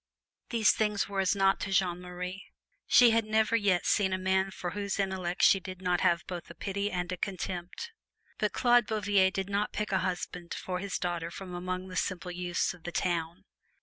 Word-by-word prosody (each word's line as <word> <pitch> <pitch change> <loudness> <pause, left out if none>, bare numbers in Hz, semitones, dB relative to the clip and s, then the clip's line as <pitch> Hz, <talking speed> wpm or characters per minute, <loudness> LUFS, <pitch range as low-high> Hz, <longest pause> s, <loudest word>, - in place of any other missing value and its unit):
These 225 -3 +4
things 210 -2 0
were 200 -1 -3
as 190 +1 +2
naught 195 0 +3
to 195 - -4
Jeanne 180 -2 +1
Marie. 180 +1 -6 0.4
She 245 -2 +7
had 225 0 +3
never 220 +1 +2
yet 200 -5 +2
seen 190 -2 +2
a - - +1
man 190 +1 +1
for 180 -2 -5
whose 200 -1 -3
intellect 190 -2 -1
she 195 - +6
did 185 0 -8
not 180 -1 0
have 175 -2 +2
both 175 -2 -7
a 170 - -10
pity 200 +3 -2
and 180 -2 -3
a 185 - -3
contempt. 185 - -4 0.5
But - - +1
Claude 240 -2 +4
Bouvier 205 -3 +3
did 190 0 -3
not 200 +1 -1
pick 210 -1 -2
a 190 - +2
husband 180 -1 -4
for 180 -1 -4
his 200 0 -3
daughter 175 -2 -2
from 180 +1 -8
among 185 +1 -4
the 185 - -8
simple 180 -1 -2
youths 175 0 -1
of 180 - -16
the 175 - -6
town. 170 +2 -2
190 Hz, 205 wpm, -30 LUFS, 180-200 Hz, 0.5 s, She